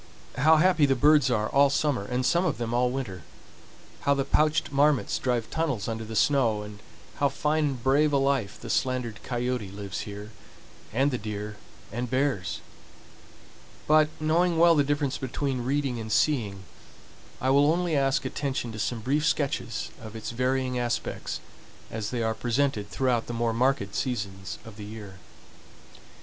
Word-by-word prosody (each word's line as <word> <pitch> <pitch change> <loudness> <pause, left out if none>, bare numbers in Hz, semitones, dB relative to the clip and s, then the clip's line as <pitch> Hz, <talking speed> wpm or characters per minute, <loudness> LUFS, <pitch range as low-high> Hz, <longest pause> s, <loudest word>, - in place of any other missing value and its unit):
How 155 +4 +6
happy 165 -3 +4
the 135 - +3
birds 145 0 +5
are 110 -3 +1
all 140 +3 +4
summer 140 -5 0
and 125 +3 -1
some 175 +4 +3
of 170 -6 0
them 120 -1 -3
all 125 +1 +2
winter; 125 -9 -4 0.8
how 140 - +2
the 135 -1 0
pouched 155 +1 +2
marmots 145 0 +2
drive 120 -3 0
tunnels 140 -11 -1
under 115 0 -3
the 110 0 -7
snow, 115 -5 +2
and 105 -1 -10 0.4
how 140 -1 +2
fine 150 +2 0
and 135 -5 -3
brave 145 +3 +3
a 140 - +3
life 135 -7 0
the - - -5
slandered 125 -4 -1
coyote 125 -4 -2
lives 100 0 -6
here, 105 +1 -7 0.6
and 135 +6 +2
the 125 - -2
deer 105 0 -5 0.3
and 120 +3 -3
bears! 130 -7 -1 1.2
But, 155 0 +5
knowing 165 +2 +2
well 170 +1 +6
the 145 -3 +4
difference 145 -1 -1
between 130 -1 -2
reading 135 -2 0
and 110 -1 -6
seeing, 105 -4 +1 0.8
I 130 - +1
will 145 +2 +5
only 175 -1 0
ask 135 0 +1
attention 130 -3 -2
to 110 - -7
some 115 +2 -2
brief 145 +6 0
sketches 140 -7 -1
of 110 -1 -9
its 110 0 -5
varying 125 +1 0
aspects 120 -1 -3 0.5
as 110 -2 -3
they 120 -2 -2
are 110 0 +1
presented 120 -3 0
throughout 125 -3 0
the 120 - -4
more 115 -1 +1
marked 120 -4 +1
seasons 100 -7 -3
of 110 -2 -11
the 105 - -7
year. 105 -3 -9
125 Hz, 165 wpm, -27 LUFS, 110-145 Hz, 1.2 s, How